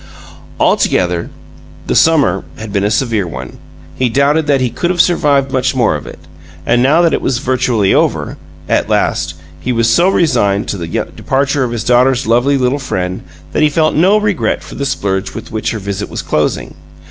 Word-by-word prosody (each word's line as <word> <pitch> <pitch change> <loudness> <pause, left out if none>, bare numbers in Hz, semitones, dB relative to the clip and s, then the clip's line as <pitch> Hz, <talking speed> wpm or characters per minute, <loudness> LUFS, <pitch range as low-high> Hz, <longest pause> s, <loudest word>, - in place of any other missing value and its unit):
Altogether, 90 -1 +1 0.6
the - - -1
summer 140 - +3
had 110 -2 -8
been 100 -1 0
a 100 - +1
severe 110 -4 0
one; 65 -5 -8 0.3
he 125 +7 0
doubted 145 +5 +2
that 140 -2 +3
he 125 -2 0
could 175 - -2
have 180 -1 -1
survived 145 -6 +2
much 130 +1 0
more 120 -9 +2
of 75 - -7
it. - - -9 0.5
And 120 +1 +2
now 150 +7 +4
that 165 - +3
it - - 0
was 130 - 0
virtually 125 -5 +1
over, - - 0 0.3
at - - 0
last, 80 0 0 0.2
he 125 - -3
was 115 -1 +1
so 175 +8 +4
resigned 105 - +1
to 100 - -2
the 85 - -5
departure 135 - -1
of 125 - -1
his 115 -2 -3
daughter's 125 +2 +3
lovely 120 +5 +2
little 130 +2 0
friend 90 -7 -3 0.3
that - - 0
he 155 - +4
felt 155 +1 +1
no 190 +7 +4
regret 210 -5 -1
for - - -11
the 140 - -3
splurge 100 -8 -2
with - - -8
which 110 -1 -2
her 115 - -3
visit 100 0 -5
was - - -5
closing. 75 -5 -1
125 Hz, 195 wpm, -14 LUFS, 100-140 Hz, 0.6 s, now